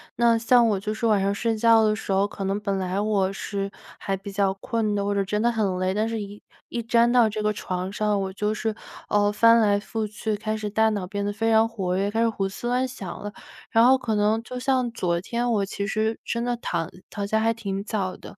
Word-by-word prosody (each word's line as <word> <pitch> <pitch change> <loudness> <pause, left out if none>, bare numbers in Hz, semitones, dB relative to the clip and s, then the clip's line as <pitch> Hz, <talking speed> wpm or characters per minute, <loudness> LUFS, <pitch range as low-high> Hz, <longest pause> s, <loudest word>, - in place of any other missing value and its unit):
那 235 -1 +4
像 235 +1 +4
我 200 -2 +1
就 215 +2 -3
是 230 +1 -1
晚 210 -2 +3
上 200 +1 +1
睡 225 +2 -1
觉 225 0 +5
的 215 0 +2
时 210 - -5
候， 195 +1 +3
可 200 - -7
能 195 +2 -1
本 200 -2 -2
来 190 +1 -1
我 200 -3 +1
是 195 0 -4 0.3
还 195 - -2
比 195 +1 -8
较 195 -1 +1
困 220 0 -1
的， 200 -1 0
或 205 0 -1
者 200 - +2
真 210 +2 -1
的 240 +1 +3
很 200 -5 -1
累， 185 0 +1
但 215 +2 0
是 225 -1 -3
一 205 +1 -8 0.3
一 235 - -4
沾 235 +1 +3
到 240 -3 +5
这 215 0 -3
个 210 0 +1
床 185 -2 -4
上， 210 0 0
我 190 0 -3
就 210 +2 -1
是， 220 0 -2 0.3
呃， 205 0 +2
翻 230 +2 +6
来 205 -2 +3
覆 220 +1 -3
去， 215 +1 -3
开 215 +1 -3
始 215 -1 -4
大 220 +2 +3
脑 200 -4 -3
变 200 +1 -3
得 205 - -1
非 225 +2 0
常 220 0 +5
活 190 -5 -2
跃， 200 +1 0
开 225 - 0
始 230 - +3
胡 195 -3 -2
思 195 +5 -6
乱 250 +2 +1
想 200 -8 -8
了。 205 - -6 0.4
然 225 - +5
后 260 +2 +6
可 235 -4 -2
能 215 +2 +2
就 250 +1 -6
像 255 -2 +1
昨 175 -6 -1
天， 240 +5 -1
我 205 -3 +1
其 200 +1 -4
实 220 +1 -1
真 235 0 -2
的 245 0 0
躺 170 -7 -3 0.2
躺 200 -1 -4
下 220 +1 +1
还 225 +1 +2
挺 195 -3 -4
早 195 -4 -2
的， - - -12
210 Hz, 275 characters per minute, -24 LUFS, 200-225 Hz, 0.4 s, 翻